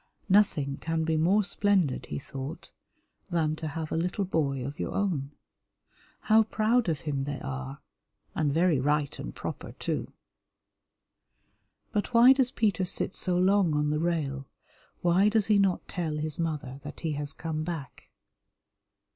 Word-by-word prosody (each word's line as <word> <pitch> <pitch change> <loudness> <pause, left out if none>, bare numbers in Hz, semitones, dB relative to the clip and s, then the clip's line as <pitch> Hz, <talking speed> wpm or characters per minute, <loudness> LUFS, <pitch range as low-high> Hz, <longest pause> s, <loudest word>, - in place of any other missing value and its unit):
Nothing 170 -9 +3
can 165 0 -1
be 160 0 0
more 185 +7 +3
splendid, 185 -6 +1
he - - -4
thought, 135 +3 -7 0.6
than 160 -3 +1
to 160 - -4
have 155 +1 -5
a - - 0
little 180 +4 -1
boy 140 -7 -1
of 140 +2 -6
your - - -3
own. 170 -9 -1 0.9
How 220 0 +5
proud 220 0 +1
of 155 -4 -1
him 140 -3 -2
they 145 -1 -4
are; 135 0 -6 0.5
and 150 -3 0
very 165 -1 +3
right 145 +1 0
and - - -6
proper, - - -6
too. - - -3 1.8
But 210 +3 -2
why 245 +3 +9
does 265 -2 +2
Peter 205 -7 +1
sit 180 +1 0
so 180 -2 +1
long 185 -3 +3
on 150 0 +1
the 150 - 0
rail, 145 -5 -1 0.5
why 180 +4 +4
does 215 -1 +2
he 210 -1 +4
not 195 -2 +1
tell 165 -5 -3
his 155 0 -3
mother 150 -5 -3
that 150 +1 -9
he 160 - -1
has 145 -1 -3
come 155 -1 -4
back? 155 -6 -7
160 Hz, 155 wpm, -28 LUFS, 145-190 Hz, 1.8 s, why